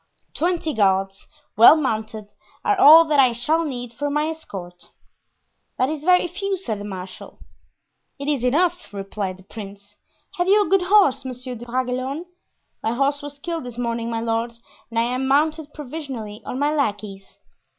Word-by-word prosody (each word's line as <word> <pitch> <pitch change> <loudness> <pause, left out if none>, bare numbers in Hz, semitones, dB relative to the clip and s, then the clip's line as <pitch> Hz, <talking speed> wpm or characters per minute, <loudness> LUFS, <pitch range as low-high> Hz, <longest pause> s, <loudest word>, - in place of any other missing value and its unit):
Twenty 335 -2 -1
guards, 195 -2 +1 0.3
well 230 +7 +9
mounted, 220 -7 -3 0.3
are 415 - +3
all 330 -2 +9
that 300 -2 +2
I 255 -3 +5
shall 310 +8 0
need 245 -6 -5
for 290 +5 -3
my 300 +2 0
escort." 180 - -9 0.9
"That 255 - +1
is 305 -1 -4
very 360 0 +5
few," 390 +3 -3
said 225 - -4
the - - -7
marshal. 190 -2 -8 0.8
"It 280 0 -6
is 285 -5 0
enough," 345 +7 +1
replied 195 -1 -4
the 190 - -17
prince. 200 0 -11 0.4
"Have 355 0 0
you 410 +1 +5
a - - -6
good 390 0 +4
horse, 370 -11 +4
Monsieur 255 0 -6
de 240 0 -9
Bragelonne?" 255 +5 -2 0.6
"My 225 - -1
horse 280 +3 0
was 290 0 -8
killed 330 +1 -4
this 245 -2 -8
morning, 235 -1 -2
my 225 -1 -2
lord, 230 +1 -1 0.4
and 230 - -6
I 230 - +4
am 255 +2 -1
mounted 305 +2 +1
provisionally 265 -8 -7
on - - -4
my 290 +2 +1
lackey's." 205 -8 -3
255 Hz, 170 wpm, -22 LUFS, 220-310 Hz, 0.9 s, well